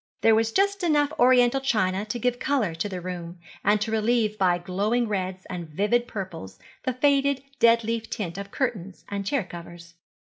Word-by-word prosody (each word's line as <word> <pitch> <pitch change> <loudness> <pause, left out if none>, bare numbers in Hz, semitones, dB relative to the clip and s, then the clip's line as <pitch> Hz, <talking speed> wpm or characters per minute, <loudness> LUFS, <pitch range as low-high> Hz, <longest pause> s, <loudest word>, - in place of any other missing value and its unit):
There 225 - +5
was 225 +1 +2
just 400 - +1
enough 300 -3 +2
Oriental 250 +1 +5
china 210 -6 0
to 215 +3 -4
give 245 +1 -1
colour 255 -11 0
to 165 +6 -3
the 185 -2 -4
room, 175 -1 -6 0.3
and 205 +1 +3
to 220 +1 -1
relieve 220 -1 +1
by 185 -4 +2
glowing 205 +7 0
reds 190 -2 -3
and 175 -3 -6
vivid 210 +9 +1
purples 165 - -7 0.3
the 255 - 0
faded 280 +1 +2 0.2
dead 230 0 +5
leaf 230 0 -3
tint 180 -3 -4
of 200 0 -7
curtains 200 -7 -3
and 200 -1 -4
chair 275 -3 +1
covers. 170 -1 -11
215 Hz, 180 wpm, -25 LUFS, 185-245 Hz, 0.3 s, There